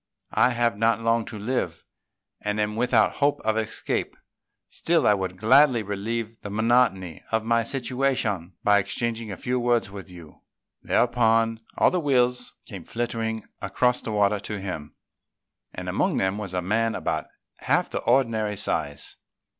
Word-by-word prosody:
I - - +4
have 120 -4 0
not 115 +1 +3
long 115 0 +1
to 110 - -7
live, 125 +5 -2 0.6
and 105 0 -2
am 105 0 0
without 115 -1 +2
hope 145 0 +2
of 110 0 0
escape; 110 -1 -2 0.5
still 165 -5 +1
I 105 - +6
would 95 -2 -3
gladly 125 +3 +5
relieve 110 +3 -4
the 105 - -6
monotony 105 -5 +1
of 110 -1 +1
my 115 +1 +2
situation 125 -7 -1
by 105 0 +5
exchanging 115 +2 -3
a 95 - -6
few 125 +1 -1
words 120 -4 +1
with 100 -1 -9
you." 85 -4 -13 0.4
Thereupon, 115 -2 +2 0.2
all - - +4
the 180 - +1
Wills 125 -4 +1
came 95 -7 -9
flitting 115 0 -3 0.2
across 125 +6 +1
the 110 - -4
water 105 -1 +2
to 105 +1 -5
him; 80 -6 -6 0.8
and - - -7
among - - 0
them 95 +2 0
was 95 -3 -5
a 90 - -1
man 110 +4 +1
of - - -6
about - - -1 0.3
half - - 0
the - - -2
ordinary 115 -5 +1
size. 70 -7 -2
110 Hz, 160 wpm, -25 LUFS, 100-120 Hz, 0.8 s, I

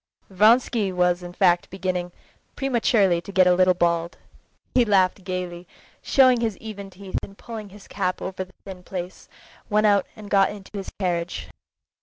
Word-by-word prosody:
Vronsky 215 +1 +3
was 180 0 +1
in 175 0 -8
fact 175 -2 +2
beginning, 180 -2 -3 0.4
prematurely, 225 -9 +2
to 200 - -9
get 190 -2 +5
a 180 - +5
little 185 0 +4
bald. 170 -1 0 0.6
He 250 - +5
laughed 195 -3 +2
gaily, 180 -1 -5 0.3
showing 255 -3 +4
his 220 -5 -1
even 200 -3 -8
teeth, 190 0 -5
and 195 - -11
pulling 220 -3 -8
his 200 +1 -15
cap 185 -2 -2
over 185 0 -4
the 185 - -23
thin 190 -2 -9
place, 180 0 -7 0.4
went 215 0 +3
out 200 -2 +3
and 210 -1 -11
got 195 -1 +4
into 205 -2 -10
his 195 -1 -5
carriage. 175 -2 -2
190 Hz, 165 wpm, -24 LUFS, 180-210 Hz, 0.6 s, get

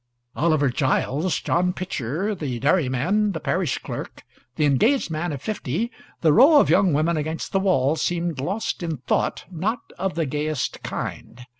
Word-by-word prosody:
Oliver 155 -3 +2
Giles, 140 +5 0
John 180 +1 +1
Pitcher, 180 - -3
the 145 -10 -4
dairyman, 170 - +1
the 160 - -3
parish 175 -7 0
clerk, - - -7 0.3
the 150 - +2
engaged 170 - +2
man 160 +2 -2
of 145 -1 -6
fifty, 215 - -2 0.3
the 155 -3 +4
row 285 - +7
of - - +3
young 190 -3 +4
women 155 +3 +1
against 155 +2 -3
the 195 - +2
wall, 155 -7 +2
seemed 170 -3 -1
lost 195 +9 -2
in 165 -3 -3
thought 130 - -1
not 200 +8 -3
of 190 -3 -1
the 165 -1 0
gayest 150 0 -2
kind. 125 +2 -6
165 Hz, 160 wpm, -23 LUFS, 145-190 Hz, 0.3 s, row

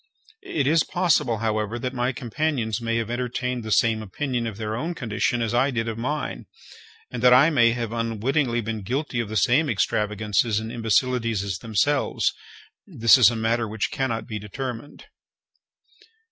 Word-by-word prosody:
It 145 -4 -2
is 155 +3 +4
possible, 165 -10 +1
however, 110 +1 -1
that 125 +2 -4
my 125 0 0
companions 125 -3 -2
may 115 0 -1
have 115 0 -2
entertained 125 0 -2
the 110 - -6
same 110 0 +3
opinion 120 +3 -3
of 105 -3 -6
their 110 -1 -3
own 165 +9 -3
condition 120 -1 -1
as 115 - -2
I 130 +3 +3
did 115 -3 -2
of 115 - -3
mine, 145 +5 -3 0.6
and 125 - -5
that 125 0 +7
I 145 +6 +6
may 120 -5 +4
have 120 -2 -4
unwittingly 115 +2 0
been 110 -1 -4
guilty 125 +4 -2
of 115 -3 -2
the 110 - -2
same 130 - +3
extravagances 105 0 0
and 110 +1 -6
imbecilities 115 -2 0
as 95 -3 -4
themselves—this 115 -1 0
is 125 -5 +7
a 120 - -4
matter 115 +1 0
which 110 0 -3
cannot 115 -6 -2
be 110 -3 -5
determined. 120 +5 -7
115 Hz, 165 wpm, -24 LUFS, 110-130 Hz, 0.6 s, that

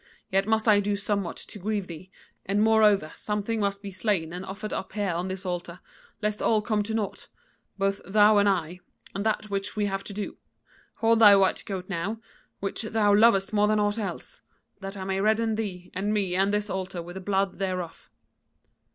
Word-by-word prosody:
Yet 195 +1 +2
must 220 +1 +1
I 210 -2 +6
do 205 0 0
somewhat 200 -3 -2
to 210 - -7
grieve 205 0 -2
thee, 175 +1 -10 0.4
and 200 +2 +1
moreover 210 -7 +4
something 210 +2 -2
must 200 0 -1
be 200 - -6
slain 185 -4 -1
and 180 +1 -5
offered 195 +2 -6
up 190 - -4
here 205 -3 -1
on 175 +2 -2
this 190 0 -5
altar, 175 -1 -4 0.4
lest 210 0 -1
all 215 -2 +2
come 215 -1 +1
to 220 +2 -3
naught, 210 -3 -3 0.5
both 195 0 0
thou 210 +2 +5
and 200 0 +4
I, 180 -2 -1 0.3
and 200 - -3
that 215 -1 -1
which 195 0 -2
we 210 -1 +1
have 195 -1 -2
to 205 - -5
do. 205 0 -5 0.6
Hold 225 0 +3
thy 205 -3 +9
white 195 -1 +2
goat 185 -2 -5
now, 195 +4 -3 0.4
which 195 +2 -3
thou 215 -2 +2
lovest 205 -2 +4
more 210 0 +4
than 215 0 +2
aught 205 +1 +1
else, 195 -5 -5 0.4
that 195 0 -7
I 190 - -5
may 190 0 -1
redden 220 +2 +2
thee 190 -5 -4
and 195 +3 -1
me 195 -4 0
and 195 +2 +2
this 210 0 0
altar 185 -3 -4
with 175 +1 -9
the 190 - -7
blood 195 0 0
thereof.' 185 -3 -4
200 Hz, 200 wpm, -27 LUFS, 190-210 Hz, 0.6 s, thy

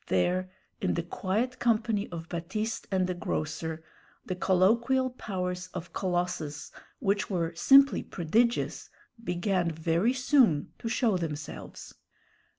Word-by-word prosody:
There, 180 - +1 0.3
in - - +1
the 170 - -1
quiet 210 +8 -2
company 220 -3 +1
of 165 -1 -6
Baptiste 215 +7 -3
and 190 -2 +1
the 180 - -1
grocer, 160 -1 -3 0.4
the 185 - -2
colloquial 230 +9 +3
powers 180 -6 -4
of 175 -1 -6
Colossus, 175 -5 -2 0.3
which 200 -4 0
were 170 -4 -1
simply 275 +10 +6
prodigious, 225 +8 0 0.3
began 180 -2 0
very 165 +8 +1
soon 250 - +3
to 230 - -3
show 225 -4 +2
themselves. 150 -3 -6
185 Hz, 120 wpm, -29 LUFS, 170-225 Hz, 0.4 s, simply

